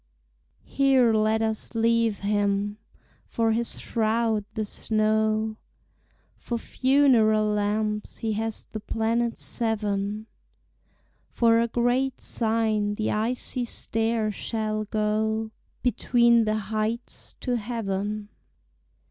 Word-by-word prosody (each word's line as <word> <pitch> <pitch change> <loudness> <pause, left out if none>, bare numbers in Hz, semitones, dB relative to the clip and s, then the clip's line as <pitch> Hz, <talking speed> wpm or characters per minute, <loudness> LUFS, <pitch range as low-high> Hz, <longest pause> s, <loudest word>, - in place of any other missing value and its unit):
Here 265 -4 +3
let 220 +1 +2
us 220 +1 -3
leave 230 -1 +2
him; 205 0 0 0.5
for 225 -1 0
his 230 +1 0
shroud 220 -1 0
the 215 -1 -1
snow, 215 +1 0 0.8
For 235 - -4
funeral 240 -5 +3
lamps 210 0 -1
he 220 -1 -2
has 220 +1 -3
the 215 - -4
planets 230 +2 -1
seven, 210 -2 -2 1.0
For 230 -1 +3
a 235 - +1
great 245 +3 0
sign 220 -2 0
the 215 - -1
icy 245 +3 0
stair 225 -1 0
shall 215 0 -3
go 220 +1 -1 0.3
Between 235 -1 +3
the 215 0 0
heights 215 +3 -4
to 250 -2 0
heaven. 210 -2 -3
220 Hz, 100 wpm, -25 LUFS, 215-230 Hz, 1.0 s, Here